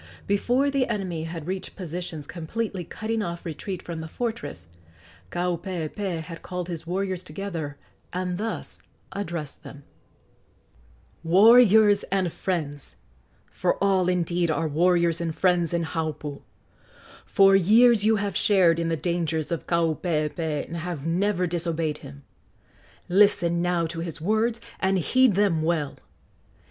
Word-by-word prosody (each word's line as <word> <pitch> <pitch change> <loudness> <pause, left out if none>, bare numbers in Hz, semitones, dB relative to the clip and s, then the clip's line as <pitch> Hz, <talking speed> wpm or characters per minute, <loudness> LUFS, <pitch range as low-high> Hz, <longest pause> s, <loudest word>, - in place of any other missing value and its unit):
Before 245 +8 +1
the 275 -2 +1
enemy 185 -7 -3
had 165 -2 -6
reached 185 +2 -5
positions 175 -4 -5
completely 185 +5 -4
cutting 220 +6 -3
off 170 -3 -5
retreat 175 +3 -5
from 170 -2 -6
the 160 - -6
fortress, 235 - -5 0.6
Kaupeepee 175 - -3
had 165 +1 -9
called 180 -1 -5
his 165 -1 -6
warriors 185 0 -2
together 165 -4 -5 0.3
and 180 0 -3
thus 225 +1 -4 0.3
addressed 170 -7 -5
them: 140 0 -11 1.4
"Warriors 210 +3 +6
and 185 -3 -1
friends! 150 -6 -3 0.6
for - - 0
all, 190 -2 +2
indeed, 175 -1 +1
are 160 +1 0
warriors 170 +2 +2
and 165 -2 -2
friends 180 -3 +2
in 170 -1 0
Haupu! 155 -3 -4 0.8
for 195 0 +5
years 220 +4 +5
you 220 +1 +4
have 205 -1 -2
shared 180 -5 +4
in 165 0 0
the 165 - 0
dangers 165 -2 -1
of 170 - -3
Kaupeepee 160 -2 0
and 170 - -6
have 165 -3 -5
never 180 +2 +1
disobeyed 165 -2 -2
him. 140 0 -12 0.8
Listen 175 -3 +4
now 175 -1 +1
to 165 +1 -5
his 165 -2 -5
words, 220 +6 +1 0.2
and 190 0 +2
heed 255 +5 +3
them 195 -5 +2
well. 155 -3 0
175 Hz, 135 wpm, -25 LUFS, 165-195 Hz, 1.4 s, Warriors